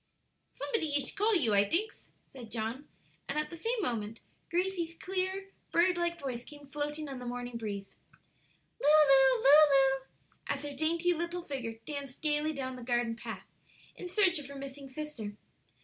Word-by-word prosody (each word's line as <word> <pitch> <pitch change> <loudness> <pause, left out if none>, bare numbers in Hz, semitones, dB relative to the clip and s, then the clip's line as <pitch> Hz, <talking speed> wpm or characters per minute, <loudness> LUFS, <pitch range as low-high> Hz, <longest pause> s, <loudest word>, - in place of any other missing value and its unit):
"Somebody 320 -11 -1
ish 285 -2 +3
call 420 +2 +2
you, 245 - +3
I 200 0 +6
dinks," 360 - -1 0.2
said 245 -4 -9
John, 230 +6 -4 0.4
and 280 - -2
at 305 - -1
the - - -6
same 455 +8 -1
moment 225 - -2 0.3
Grace's 345 -1 -1
clear, 380 +2 -3 0.2
bird 355 +2 +4
like 345 0 -1
voice 250 -5 -4
came 290 0 -12
floating 295 +1 -3
on 270 -2 -6
the 250 - -7
morning 245 0 -5
breeze, 205 -4 -5 0.9
"Lulu, 275 -5 +6
Lulu!" 275 -2 +6 0.4
as 280 +1 -2
her 290 -1 -5
dainty 335 +4 +2
little 340 +1 -3
figure 255 -7 -4
danced 280 -1 -6
gayly 300 0 +1
down 260 -3 -4
the - - -9
garden 240 -1 0
path - - -7 0.5
in 360 - -7
search 365 -3 +3
of 285 - -8
her 280 - -9
missing 275 0 -8
sister. 260 -8 -6
290 Hz, 165 wpm, -31 LUFS, 255-335 Hz, 0.9 s, I